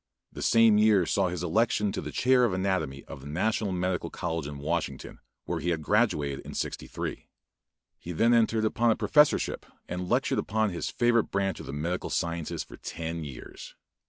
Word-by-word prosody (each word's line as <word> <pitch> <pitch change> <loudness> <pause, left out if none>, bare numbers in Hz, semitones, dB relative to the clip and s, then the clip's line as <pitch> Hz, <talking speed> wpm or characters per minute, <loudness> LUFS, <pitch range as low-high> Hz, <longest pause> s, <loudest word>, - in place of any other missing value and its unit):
The - - -8
same 115 -2 +5
year 105 -4 +5
saw 95 +3 +1
his 90 -1 -4
election 105 +3 +1
to - - -3
the - - -6
chair 125 0 +3
of 115 -6 +2
anatomy 95 -8 -1
of 70 - -10
the 70 - -10
National 100 +6 0
Medical 90 -1 -1
College 80 -4 -3
in 75 -1 -7
Washington, 80 +4 -3 0.3
where 85 - -2
he 85 +3 -2
had 80 -3 -1
graduated 75 - +1
in - - -9
'63. - - -4 0.7
He 85 - -7
then 115 +8 +3
entered 110 -1 +3
upon 115 +2 +2
a 110 - +4
professorship 150 -1 +3 0.2
and 90 0 -4
lectured - - +1
upon 110 -1 0
his 85 - -3
favorite 120 -2 +2
branch 95 -1 -1
of - - -9
the 70 - -5
medical 85 +5 -2
sciences 85 -2 -2
for - - -13
ten 80 0 -5
years. 70 -4 -9
90 Hz, 185 wpm, -28 LUFS, 80-110 Hz, 0.7 s, same